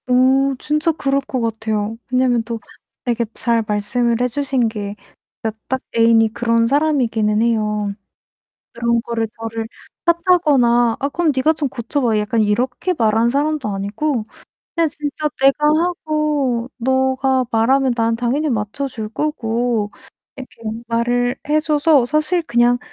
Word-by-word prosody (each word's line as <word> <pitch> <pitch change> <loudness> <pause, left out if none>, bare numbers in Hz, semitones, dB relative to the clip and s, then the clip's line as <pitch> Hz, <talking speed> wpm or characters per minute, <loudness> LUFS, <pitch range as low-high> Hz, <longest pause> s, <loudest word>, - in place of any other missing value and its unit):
어, 265 +2 +4
진짜 305 +2 +1
그럴 275 -3 0
것 265 -2 -4
같아요. 220 -1 -2
왜냐면 255 -2 +2
또 230 0 -5 0.4
아 - - -4
이렇게 235 0 0
잘 230 -1 0
말씀을 230 +3 0
해주신 255 0 0
게 205 -2 -5 0.5
그러니까 220 -1 -4
딱 260 0 -1 0.2
애인이 225 -1 +4
그런 230 -1 +2
사람이기는 240 -7 +1
해요. 215 -3 0 0.8
그런 235 0 0
거를 230 -1 -2
저를 225 0 -4 0.4
탓하거나 290 -10 +3
"아, 280 - -2
그럼 330 +1 +1
가 265 +4 +3
좀 310 -2 -2
고쳐봐." 240 -1 -1
약간 215 +2 0
이렇게 245 - 0
말하는 225 -5 +2
사람도 285 +1 0
아니고 210 +6 -2 0.5
그냥 335 -1 +2
진짜 300 0 -3
내가 275 +2 +4
하고 305 -6 0
너가 260 +1 +1
말하면 260 +4 +3
난 230 -1 +1
당연히 250 +6 0
맞춰줄 220 +1 -3
거고 235 -4 -1 0.5
이렇게 260 -3 -11 0.3
말을 245 +1 0
해 305 +1 +3
줘서 305 -3 +3
사실 305 +6 +1
그냥 240 -4 +2
245 Hz, 285 characters per minute, -19 LUFS, 225-285 Hz, 0.8 s, 어